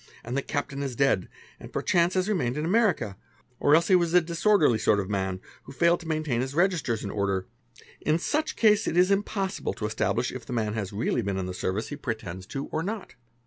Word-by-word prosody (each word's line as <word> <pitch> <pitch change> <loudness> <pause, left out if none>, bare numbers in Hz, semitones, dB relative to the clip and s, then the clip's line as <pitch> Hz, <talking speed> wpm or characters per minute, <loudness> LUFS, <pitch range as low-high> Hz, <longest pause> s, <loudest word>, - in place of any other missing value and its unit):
and 120 +3 -4
th 140 - -2
captain 140 -1 -3
is 135 -3 -3
dead, 135 -8 +2 0.3
or - - -9
perchance 175 +1 +1
has 185 +1 +1
remained 145 - 0
in 150 - -1
America, 185 - +2 0.4
or 145 - +5
else 165 +1 +3
he 190 - +5
was 170 -2 +2
disorderly 170 - +3
sort 105 - +3
of 100 0 -3
man 95 -2 -1 0.3
who - - -10
failed 170 +5 +3
to 170 - -10
maintain 155 -6 0
his 135 +2 -4
registers 170 - +1
in 100 - -4
order, 100 -2 -1 0.6
I 155 +1 +2
such 305 - -1
case 215 0 +4
it 170 - -1
is 185 +2 +5
impossible 195 -1 -1
to 105 - -4
establish 115 +3 0
if 130 - -7
the 125 - -7
man 110 -3 -1
has 105 -4 -3
really 110 +3 0
been 100 -3 -2
in 95 - -2
th 90 0 -5
service 100 +5 -2
he 145 - -4
pretends 105 - -5
to 135 0 -4
or 155 - -1
not. 205 +4 -5
140 Hz, 220 wpm, -27 LUFS, 110-175 Hz, 0.6 s, or